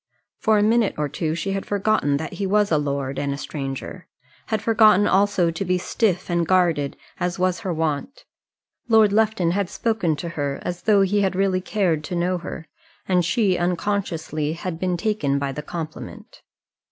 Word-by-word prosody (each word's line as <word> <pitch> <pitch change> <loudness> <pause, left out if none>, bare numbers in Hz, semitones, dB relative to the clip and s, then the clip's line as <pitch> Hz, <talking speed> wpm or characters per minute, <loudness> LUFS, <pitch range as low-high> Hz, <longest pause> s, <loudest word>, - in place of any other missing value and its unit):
For 220 -1 +3
a 205 - +3
minute 225 0 +2
or 150 -1 0
two 155 +2 -2
she 195 +3 -3
had 195 0 -2
forgotten 200 -8 +1
that 160 +2 -5
he 200 - -2
was 205 0 +2
a 155 - +3
lord 140 -2 -2
and 140 -1 -1
a 140 - -3
stranger 140 +5 -6 0.4
had 220 - 0
forgotten 215 -2 +5
also 195 -4 +2
to 170 - -3
be 185 -1 +1
stiff 185 0 0
and 170 -2 0
guarded 170 -6 +2 0.2
as 180 +1 -1
was 185 +1 +1
her 195 -5 -3
wont. 160 - -3 0.6
Lord 220 -3 +5
Lufton 215 -5 +2
had 195 0 -1
spoken 220 -9 0
to 170 +3 -5
her 145 -4 -3
as 175 0 -4
though 205 -3 +4
he 200 +2 +1
had 190 -2 0
really 190 -1 +1
cared 180 -6 0
to 180 - -4
know 180 +1 0
her; 165 -1 -7 0.4
and 180 -2 +3
she, 190 0 +1
unconsciously, 175 -4 -1
had 170 0 -5
been 180 -1 0
taken 170 -8 0
by 140 -1 -2
the 150 - -5
compliment. 160 0 -8
180 Hz, 185 wpm, -23 LUFS, 160-205 Hz, 0.6 s, forgotten